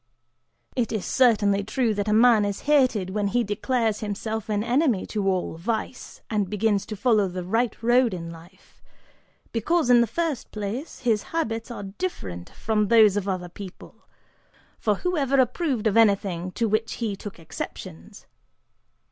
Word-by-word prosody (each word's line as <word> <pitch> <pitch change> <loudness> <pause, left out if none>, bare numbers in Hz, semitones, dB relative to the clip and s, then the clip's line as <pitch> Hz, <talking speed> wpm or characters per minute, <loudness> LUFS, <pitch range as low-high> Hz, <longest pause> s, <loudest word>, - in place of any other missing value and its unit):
"It 245 -3 0
is 215 -4 -2
certainly 205 -6 +3
true 225 +2 0
that 205 0 -2
a - - +1
man 225 0 +5
is 205 -1 -2
hated 255 -10 +2
when 205 0 0
he 240 +4 +1
declares 220 +1 0
himself 215 +1 -4
an 210 -1 0
enemy 245 - +1
to 205 -3 -2
all 185 -3 -1
vice, 225 +7 -4
and 210 -4 -1
begins 210 -1 0
to 215 - -5
follow 215 -2 +2
the 180 0 -5
right 225 +6 0
road 240 0 +4
in 170 -2 -6
life, 170 +3 -16 0.7
because, 250 +4 +1
in 240 -1 +7
the 235 - +2
first 315 +3 -2
place, 215 +8 -5
his 225 -5 +2 0.2
habits 225 -7 -2
are 235 - -6
different 195 - -5
from 215 -2 -1
those 215 -2 +6
of 205 -1 -2
other 185 -2 -2
people; 190 +1 -10 0.9
for 210 -2 +1
who 360 - -2
ever 275 -1 +2
approved 260 -2 0
of 215 - +2
anything 195 -5 +2
to 230 - 0
which 220 +2 0
he 220 -4 -3
took 200 +1 -9
exceptions? 85 - -8
215 Hz, 165 wpm, -25 LUFS, 200-240 Hz, 0.9 s, in